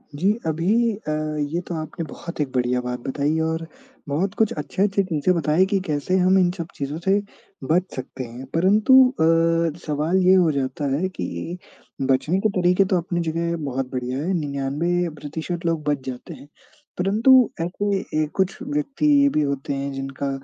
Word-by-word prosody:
जी। 190 +7 +2 0.2
अभी 200 +9 +2 0.2
अ, - - 0 0.3
ये 150 +4 -1
तो 175 - -4
आपने 155 +1 -5
बहुत 170 - -8
एक 140 -3 -2
बढ़िया 125 0 +1
बात 125 0 -4
बताई, 145 +4 0
और 160 0 -1 0.4
बहुत 185 +7 0
कुछ 220 -2 +3
अच्छे-अच्छे 195 +6 0
चीज़ें 170 0 +1
बताई 165 +3 +3
कि 195 0 0
कैसे 155 +3 0
हम 185 +1 +4
इन 180 -1 +4
सब 170 -2 -4
चीज़ों 140 +2 -4
से 195 +1 +4 0.5
बच 175 +2 +4
सकते 130 0 -6
हैं। 120 +2 -9
परंतु 205 +9 +4 0.2
अ, 165 - +2
सवाल 155 +4 0
ये 185 - +7
हो 175 -4 +4
जाता 140 0 -2
है 185 +6 -1
कि 90 - -5 0.4
बचने 135 +7 +1
के 215 - +2
तरीके 180 +2 +4
तो 185 -1 +1
अपनी 175 0 -2
जगह 170 +1 -1
बहुत 130 -1 -3
बढ़िया 125 0 -3
हैं, 185 +4 -1
99% 160 +3 -2
लोग 165 -2 0
बच 140 -3 -1
जाते 125 -1 -6
हैं, - - -13 0.5
परंतु 225 +7 +5
ऐसे 195 +4 -1 0.3
ए - - 0
कुछ 190 0 0
व्यक्ति 290 0 -2 0.2
ये 280 - +5
भी 155 - +1
होते 140 -1 -2
हैं 140 0 -3
जिनका 135 +1 -4
165 Hz, 175 wpm, -23 LUFS, 140-185 Hz, 0.5 s, ये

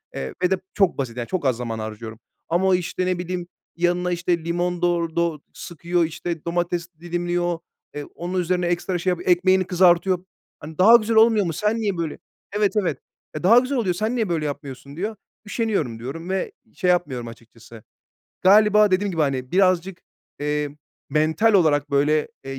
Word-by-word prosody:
Eee, 65 - -4
ve 180 - +2
de 190 - +3 0.2
çok 195 -4 +2
basit 125 -3 -4
yani, 120 - -4
çok 185 -6 -3
az 125 -3 +2
zaman 115 -2 -4
harcıyorum. 110 +1 -7 0.3
Ama 175 +3 +2
o, 185 - +4
işte, 180 +1 -2
ne 180 -1 -1
bileyim, 180 0 -4 0.3
yanına, 175 +1 0
işte, 170 -1 -1
limon 175 +1 -1
dor 170 -1 0
do 170 -3 0
sıkıyor, 170 +1 -2
işte, 165 0 -5
domates 175 0 -1
dilimliyor, 175 0 -2 0.4
eee, 145 - -4
onun 180 +2 -3
üzerine 180 0 0
ekstra 175 +1 -1
şey 185 - 0
yapıyor, 180 0 -2
ekmeğini 185 +1 +4
kızartıyor. 180 0 +3 0.3
Hani 155 +1 -10
daha 220 +6 +8
güzel 225 0 +2
olmuyor 220 -3 +5
mu, 165 - -2
sen 210 +7 0
niye 200 -4 -1
böyle 165 -2 -3 0.4
Evet, 210 0 +2
evet. 180 - -2 0.4
"E, 155 - -5
daha 230 +6 +7
güzel 260 +1 -2
oluyor, 185 -7 0
sen 220 +6 -1
niye 220 -6 -1
böyle 160 -3 -1
yapmıyorsun?" 140 0 -7
Diyor. 210 +5 -3 0.3
"Üşeniyorum." 200 - -2
diyorum 165 +9 -7
ve 190 - -2 0.2
şey 180 - -1
yapmıyorum 135 -10 0
açıkçası. 115 -1 -14 0.6
Galiba 210 +1 +6
dediğim 195 +2 +1
gibi, 165 -3 -2
hani, 130 -3 -2
birazcık, 185 -1 +2 0.4
eee, 150 0 -1 0.4
mental 160 +9 +2
olarak 150 -6 +3
böyle, 150 +2 +2 0.2
eee, 135 0 -6
175 Hz, 180 wpm, -23 LUFS, 150-185 Hz, 0.6 s, daha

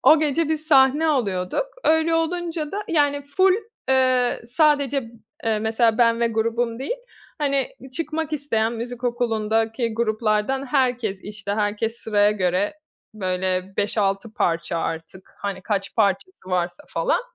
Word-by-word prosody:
o 315 - +7
gece 310 +1 +1
biz 315 0 -2
sahne 280 +1 +5
alıyorduk. 220 - 0 0.2
Öyle 320 +1 +3
olunca 330 -1 -1
da 415 - -2
yani 290 -3 +2
full, 375 +6 +3 0.3
eee, 255 -2 +3
sadece, 280 -2 +2 0.3
eee, 220 -1 +1
mesela 220 +1 +2
ben 230 -1 +4
ve 235 - +3
grubum 230 +1 -1
değil, 280 - -3 0.4
hani 280 -3 +1 0.3
çıkmak 320 -1 -3
isteyen 235 -7 0
müzik 240 +1 -6
okulundaki 225 -1 0
gruplardan 220 +3 0
herkes, 245 -7 0
işte 205 -1 -5
herkes 215 +2 -1
sıraya 205 -2 +2
göre, 190 +1 0 0.4
böyle 185 -1 -2
5-6 205 +1 0
parça 165 -4 0
artık. 165 +3 -5
Hani, 195 -2 -4
kaç 195 -1 -2
parçası 200 - 0
varsa 175 -1 -1
falan. - - +1
230 Hz, 130 wpm, -23 LUFS, 205-285 Hz, 0.4 s, o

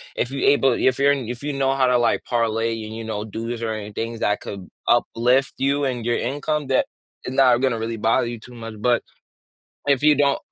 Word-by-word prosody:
if 120 - -1
you 135 0 -2
able 135 -3 +4
if 130 +1 +1
you're 140 +1 +5
in 135 -5 -4
if 120 +2 -5
you 145 0 -3
know 135 0 +1
how 130 -2 +3
to, 125 - +4
like, 120 -1 +1
parlay 115 -1 0
and, 110 - -7
you 115 - -6
know, 110 -1 -4
do 110 +2 -6
this 120 -1 -4
or 110 -1 -1
any 105 -1 -6
things 115 +2 -4
that 105 - +1
could 95 -3 -8 0.2
uplift 125 +3 +2
you 140 +1 +1
and 120 -3 -2
your 120 - +1
income, 145 +3 -2
that 130 - +2 0.4
is 130 - -4
not 130 -2 +5
gonna 130 -4 +1
really 115 0 -3
bother 115 +2 +2
you 120 -1 -5
too 125 +2 -14
much. 115 -2 -8
But 120 +2 +2 0.9
if 140 -2 +2
you 150 0 +6
don't 140 0 +2
120 Hz, 235 wpm, -22 LUFS, 115-135 Hz, 0.9 s, you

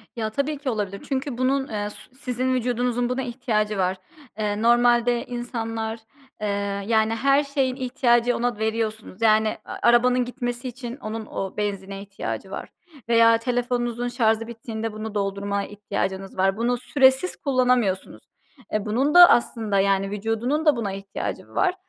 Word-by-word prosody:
Ya, 220 -2 -2
tabii 280 +5 -2
ki 275 -2 -3
olabilir 200 -3 -3
çünkü 265 -2 -2
bunun, 265 +1 +1
eee, 205 -1 -3
s - - -10 0.2
sizin 255 -1 -1
vücudunuzun 245 0 0
buna 255 +1 -1
ihtiyacı 220 -4 -1
var. 185 0 0 0.4
Eee, 210 0 -1
normalde 240 0 +3
insanlar, 225 -2 -4 0.4
eee, 210 - -1 0.4
yani, 220 0 +2
her 275 +5 +3
şeyin 275 -3 -1
ihtiyacı 245 -2 +2
ona 240 -2 -1
veriyorsunuz. 220 -2 -3
Yani, 220 -1 +3
a - - -7
arabanın 245 +1 +4
gitmesi 245 0 -4
için 245 +1 -7
onun 220 -3 -5
o 195 -1 -5
benzine 195 -1 -3
ihtiyacı 200 0 -6
var - - -6 0.4
veya 230 0 +6
telefonunuzun 245 0 -1
şarjı 225 -2 +1
bittiğinde 225 -1 -5
bunu 215 0 -6
doldurmaya 200 0 -1
ihtiyacınız 195 -2 -4
var. 195 +2 +2
Bunu 245 +2 +1
süresiz 265 +6 +3
kullanamıyorsunuz. 250 -8 0 0.5
E, 215 0 0
bunun 260 +8 +1
da 355 0 +11
aslında, 220 -4 +2
yani, 195 0 +2
vücudunun 225 +9 -1
da 300 -3 +5
buna 220 -4 -2
ihtiyacı 195 0 -5
var 370 -2 +1
235 Hz, 150 wpm, -24 LUFS, 215-250 Hz, 0.5 s, da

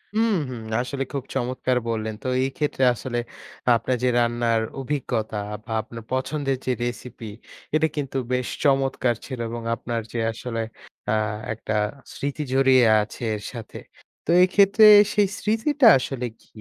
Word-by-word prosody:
হুম, 225 0 +3 0.2
হুম, 120 -3 -6 0.2
আসলে 135 +2 -3
খুব 140 - -2
চমৎকার 125 0 0
বললেন। 110 -1 -2
তো - - -3 0.2
এই 135 - 0
ক্ষেত্রে 145 -3 0
আসলে 120 +1 -4 0.6
আপনার 125 +2 0
যে, - - +3
রান্নার 120 -1 +1 0.2
অভিজ্ঞতা 120 -6 -2 0.3
বা - - -9
আপনার 115 +1 -10
পছন্দের 135 0 -1
যে 130 - +1
recipe, 120 -2 -6 0.5
এটা 160 +1 +3
কিন্তু 135 -2 -3 0.2
বেশ 125 -1 0 0.2
চমৎকার 135 -3 +2
ছিল 130 -3 -6
এবং 120 0 -5
আপনার 115 -1 -3
যে 120 - -2
আসলে 115 0 -4 0.5
আ - - +2 0.4
একটা 110 0 -5 0.4
স্মৃতি 145 +2 -3
জড়িয়ে 130 -2 +5 0.2
আছে 105 +3 -8
এর 105 - -7
সাথে। 115 -3 -8 0.5
তো 165 - 0
এক্ষেত্রে 200 +3 +5 0.3
সেই 205 -2 +3
স্মৃতিটা 225 +5 +2
আসলে 125 -1 -4 0.2
কি? - - -25
130 Hz, 150 wpm, -24 LUFS, 115-140 Hz, 0.6 s, জড়িয়ে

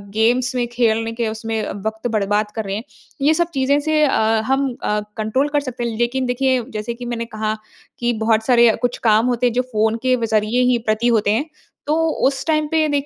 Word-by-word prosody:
Games 245 +4 +2
में 240 -1 0
खेलने 225 -1 +1
के 230 -1 -2
उसमें 225 0 -4 0.3
वक़्त 220 +2 -2
बर्बाद 210 0 0
कर 220 -2 -3
रहे 195 - -3
हैं। 220 - -4 0.4
ये 300 +3 +4
सब 345 +1 0
चीज़ें 275 +2 +2
से 305 0 +1
अ, 270 - +1 0.3
हम 270 +1 +1 0.2
अ, 210 0 0 0.2
कंट्रोल 260 +7 0
कर 295 0 +1
सकते 250 -3 -5
हैं, 230 -2 -2
लेकिन 245 +3 0
देखिए 255 0 +1
जैसे 215 +2 -3
कि 245 +1 -9
मैंने 235 -1 -3
कहा, 215 -1 -3 0.5
कि 240 0 +1
बहुत 220 -1 +2
सारे 240 -2 +5
कुछ 245 0 0
काम 215 +2 +4
होते 250 0 +1
हैं, 240 - -1
जो 250 - +2
फ़ोन 220 +1 +1
के 255 0 +3
व 235 - -2
ज़रिए 215 +4 +2
ही 240 - +3
प्रति 215 +2 +1
होते 215 -3 +2
हैं। 285 +9 -1 0.4
तो 300 - +2 0.3
उस 270 -1 -2
टाइम 310 -1 +2
पे 315 0 +1
देख 285 -1 0
240 Hz, 220 wpm, -20 LUFS, 220-265 Hz, 0.5 s, सारे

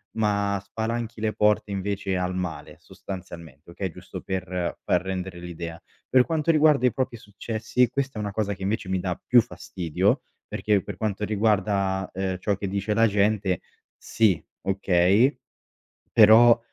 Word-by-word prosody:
ma 100 -2 0
spalanchi 115 +2 -4
le 110 0 -1
porte 105 -1 +2
invece 100 0 -2
al 90 0 -1
male 90 -3 -5
sostanzialmente, 85 -5 -10
okay, 95 +1 -4
giusto - - -9
per 90 -2 -3
far 90 - +2
rendere 95 -1 -5
l'idea. 85 -1 -7 0.3
Per 130 -1 +5
quanto 160 -1 -1
riguarda 150 -4 +4
i 125 - +3
propri 130 -3 -2
successi, 110 +3 -1
questa 135 -3 -3
è - - -2
una 100 -1 -3
cosa 105 -1 -1
che 95 - -18
invece 105 0 -2
mi 95 0 0
dà 90 -2 -3
più 125 -1 +7
fastidio, 95 - -1 0.3
perché 105 -2 +1
per 100 - -6
quanto 105 0 -2
riguarda, 100 -3 0
ehm, 95 0 -2
ciò 100 +2 0
che 100 - -4
dice 100 +2 -1
la 115 +1 +4
gente, 100 -2 +1 0.4
sì 105 -7 +1 0.2
okay, 95 +6 +3 0.8
però, 115 +2 +7
100 Hz, 155 wpm, -25 LUFS, 95-110 Hz, 0.8 s, più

